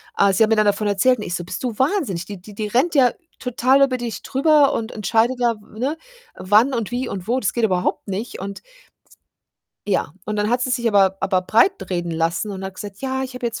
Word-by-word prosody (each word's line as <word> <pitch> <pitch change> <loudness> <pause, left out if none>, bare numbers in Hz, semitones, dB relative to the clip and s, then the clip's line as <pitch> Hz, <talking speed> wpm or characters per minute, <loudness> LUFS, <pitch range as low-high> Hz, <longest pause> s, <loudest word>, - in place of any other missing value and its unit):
ah, 200 -1 +4
sie 220 +4 +4
hat 220 - +2
mir 225 - +4
dann 215 - +4
davon 205 +1 +1
erzählt 220 +6 +3
und - - -5
ich 175 - -3
so: 175 - -4
„Bist 185 +7 -6
du 235 -4 -3
wahnsinnig? 265 - 0
Die 200 -2 -8
die 205 +1 -13
die 215 0 -3
rennt 270 +9 +1
ja 255 -3 +5 0.3
total 255 +2 +3
über 255 -2 +1
dich 240 -2 -5
drüber 285 +1 +3
und 225 0 -3
entscheidet 225 +3 +1
da, 235 -1 +2
w 215 +1 -15
ne? 285 +6 -1 0.4
Wann 215 +8 +3
und 230 -1 -2
wie 250 +1 -2
und 190 0 -6
wo. 250 +2 +1
Das 205 - -1
geht 235 - -1
überhaupt 180 -3 -1
nicht.“ 200 +5 -4
Und 200 +1 -6
das - - -43 1.2
ja. 190 -6 0
Und 215 0 -3
dann 210 +1 0
hat 245 +1 +1
sie 255 - -1
sich 240 -2 +1
aber 195 -2 +3
aber 185 -2 +1
breitreden 190 - +1
lassen 165 +5 -1
und 190 -1 -6
hat 190 - -5
gesagt: 200 +1 -8
„Ja, 265 0 -2
ich 260 -1 -6
habe 250 - -7
jetzt 230 -1 -4
220 Hz, 245 wpm, -21 LUFS, 195-255 Hz, 1.2 s, ja